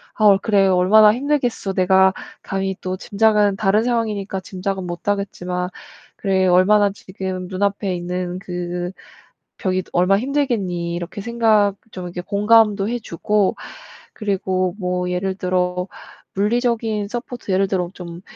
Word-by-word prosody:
"아 215 - +1
어 200 -2 +7
그래 200 -2 +3
얼마나 200 +4 +6
힘들겠어. 250 -6 -1
내가 190 0 +4 0.3
감히 195 0 -2
또 185 0 -3
짐작은 210 0 +2
다른 210 +2 +2
상황이니까 215 -5 -1
짐작은 190 0 -4
못하겠지만 180 -1 -3 0.5
그래 190 -1 +1
얼마나 200 +3 +5
지금 185 -1 -6
눈앞에 195 0 -1
있는 180 +1 -4
그 175 -2 -4 0.7
벽이 185 -1 0
얼마나 180 +3 +3
힘들겠니?" 215 -12 -1
이렇게 175 +3 -6
생각 220 -3 +2 0.2
좀 185 -3 -7
이렇게 175 0 -5
공감도 210 +1 +3
해 240 - -1
주고 205 0 0 0.6
그리고 190 -3 -1
뭐 180 -1 -1
예를 190 +1 -1
들어 180 -1 -1 0.5
물리적인 220 0 0
서포트 245 0 -7
예를 195 +1 +2
들어 180 -3 -1
좀 170 -2 -9
195 Hz, 295 characters per minute, -20 LUFS, 180-210 Hz, 0.7 s, 어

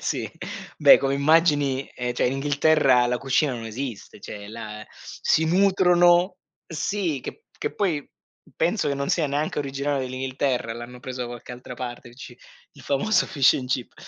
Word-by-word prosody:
sì, - - -3 0.5
beh, - - +8
come 135 0 0
immagini 145 -2 +2
ehm, 125 0 -3
cioè - - +1
in 125 - 0
Inghilterra 140 -2 +3
la 125 0 -1
cucina 135 +2 +1
non 115 -2 -6
esiste, 115 -3 -7
cioè 100 0 -8
là 110 -1 -8
si 160 - 0
nutrono 180 0 +4 0.3
sì 165 -2 -2
che 450 - -9
che 440 - -3
poi 165 -8 -1 0.5
penso 175 +2 +1
che 140 - 0
non 140 0 -3
sia 165 -4 +1
neanche 145 +2 -2
originale 140 0 -2
dell'Inghilterra 130 -1 -2
l'hanno 120 +2 -9
preso 130 0 -5
da - - -4
qualche 120 0 -9
altra 125 0 -9
parte 120 -1 -7
il 120 - -17
ci 125 -2 -11 0.3
il - - -16
famoso 145 +11 +1
Fish&Chips. 130 -3 +1
135 Hz, 160 wpm, -24 LUFS, 125-155 Hz, 0.5 s, beh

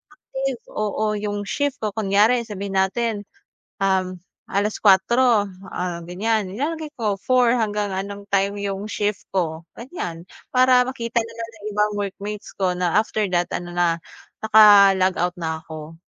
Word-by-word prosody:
active, 270 -4 -4
oo, 215 0 -1
'yung 205 0 -3
shift 285 +3 -2
ko, 215 - +1
kunyari 220 +3 +3
sabihin 200 -2 -4
natin, 205 +2 0 0.6
um, 190 -1 +1 0.3
4:00, 210 +3 +3 0.3
ah, 180 -1 -3
ganiyan, 205 +2 -1
nilalagay 315 +4 -3
ko 210 -4 -1
4 250 +2 +3
hanggang 210 -3 -1
anong 200 +1 -5
time 200 +1 +2
'yung 200 0 -3
shift 205 -1 -2
ko, 160 -3 -1 0.2
ganiyan. 175 - -6 0.3
Para 255 0 +6
makita 235 -2 -2
nila 230 0 -7
na 225 -1 -10
ibang 210 0 +1
workmates 205 +1 -5
ko 190 -2 +1
na 180 -2 0
after 215 0 +1
that 175 -1 0
ano 175 0 -4
na, 170 -1 +2 0.4
naka-log 200 -4 +6
out 180 +1 0
na 160 -2 -3
ako. 160 0 -10
205 Hz, 140 wpm, -22 LUFS, 190-225 Hz, 0.6 s, Para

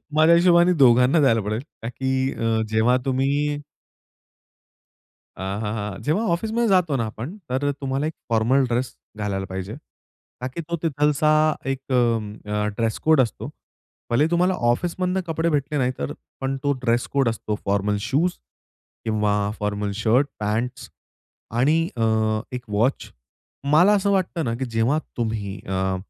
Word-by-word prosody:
माझ्या 160 +2 +6
हिशोबाने 175 0 +5
दोघांना 125 +3 +5
द्यायला 115 -5 +4
पडेल 105 +2 -2 0.2
का 115 - -3
की 130 +1 -1
अ, 115 -1 0
जेव्हा 110 +3 +3
तुम्ही 140 +3 0 1.8
हां, 95 +2 -3
हां, 105 0 -2
हां. 105 -2 -5
जेव्हा 165 +10 +1
ऑफिसमध्ये 225 +6 0
जातो 180 -7 +3
ना 115 - 0
आपण, 120 - -7
तर 145 +3 0
तुम्हाला 135 +1 -3
एक 160 - -4 0.2
फॉर्मल 115 +4 +3
ड्रेस 120 +2 -2 0.2
घालायला 100 -2 -2
पाहिजे, 95 +1 -6 0.7
का 125 - -2
की 150 +6 -6
तो 170 +2 -3
तिथला 150 0 +2 0.4
एक 135 0 -2
अ, 105 -4 0
ड्रेसकोड 125 +6 +2
असतो. 115 -4 -3 0.6
भले 145 +6 +3
तुम्हाला 180 +2 +3 0.2
ऑफिसमधनं 180 +7 0
कपडे 165 +1 0
भेटले 150 0 -1
नाही. 125 -2 +1
तर 70 - -3 0.3
पण 135 0 -1
तो 145 - +2
ड्रेसकोड 120 +2 +1
असतो. 110 -1 -3
फॉर्मल 100 +1 +1
शूज 145 - 0 0.7
किंवा 105 -2 +1 0.3
फॉर्मल 105 -1 -2
शर्ट, 115 +6 +2
पँट्स 110 +4 -2 0.7
आणि 150 +6 +4 0.2
अ, 115 - 0 0.5
एक 125 -1 -5
वॉच. 110 +6 0 0.6
मला 175 +7 +6
असं 200 0 +1
वाटतं 180 -4 0
ना 115 - -1
की 130 - -3
जेव्हा 120 +5 +1 0.2
तुम्ही 110 -4 -3
अ, 95 0 0
130 Hz, 145 wpm, -23 LUFS, 110-155 Hz, 1.8 s, माझ्या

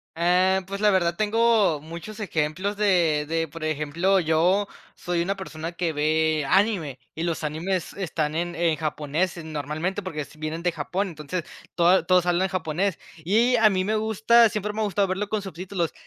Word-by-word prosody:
Eh, 180 +3 +3
pues, 200 +1 -5
la 210 - +5
verdad, 170 -3 +2
tengo 215 -5 +2
muchos 170 +8 -9
ejemplos 185 +1 -2
de 175 -7 +2
de, 165 0 0
por 160 +2 -9
ejemplo, 155 +5 +1
yo 175 +5 +2 0.3
soy 175 -1 -2
una 195 +3 -1
persona 165 -3 -6
que 170 -2 -2
ve 155 0 +1
anime 185 - +1 0.2
y 165 - -3
los 165 -2 -2
animes 170 +4 -2
están 155 -5 -2
en 175 +1 -2
en 165 -2 +1
japonés 155 +3 -2
normalmente, 155 +5 -3
porque 155 -6 -5
vienen 155 +2 -4
de 175 -1 +1
Japón. 180 +6 -2
Entonces 160 +1 -5 0.3
todos 175 +2 +4
todos 180 -1 +4
hablan 180 +2 +1
japonés 185 +1 -1 0.2
y 230 +8 +3
a 220 -2 +5
mí 185 -1 0
me 215 +1 0
gusta, 220 +2 +4
siempre 210 -1 -3
me 220 - -3
ha - - +2
gustado 200 -1 +1
verlo 195 +2 -2
con 215 0 -1
subtítulos, 185 -2 -4
175 Hz, 175 wpm, -25 LUFS, 160-200 Hz, 0.3 s, la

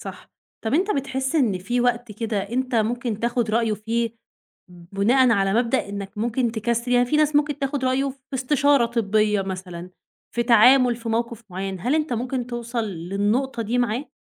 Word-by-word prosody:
صح، - - -10 0.3
طَب 220 +5 0
أنت 380 +6 +2
بتحس 265 0 -2
إن 220 -10 +2
في 240 +7 -1
وقت 240 -2 0
كده 220 0 -2
أنت 245 +5 -2
ممكن 230 0 -1
تاخد 235 -1 0
رأيُه 225 0 +1
فيه؟ 230 +2 -2 0.5
بناءًا 200 +9 +2
على 195 -1 +1
مبدأ 235 -1 +1
إنك 200 +1 -7
ممكن 235 +1 0
تكسِّل 235 +2 -1
يعني 245 0 +4
في 300 - +1
ناس 305 -1 +3
ممكن 295 0 +1
تاخد 275 -1 -2
رأيه 265 +2 +1
في 270 - -14 0.2
استشارة 275 -1 +3
طبية 215 -3 +1
مثلًا، 185 -2 -7 0.4
في 235 - +1
تعامل 245 +1 +5
في 230 -1 -7
موقف 235 0 -2
مُعيّن، 190 0 -5
هل 250 +8 0
أنت 310 -4 0
ممكن 245 +1 -2
توصل 235 -1 -3
للنقطة 205 +7 -1
دي 235 +3 -1
معاه؟ 245 +4 -1
235 Hz, 175 wpm, -23 LUFS, 210-255 Hz, 0.5 s, تعامل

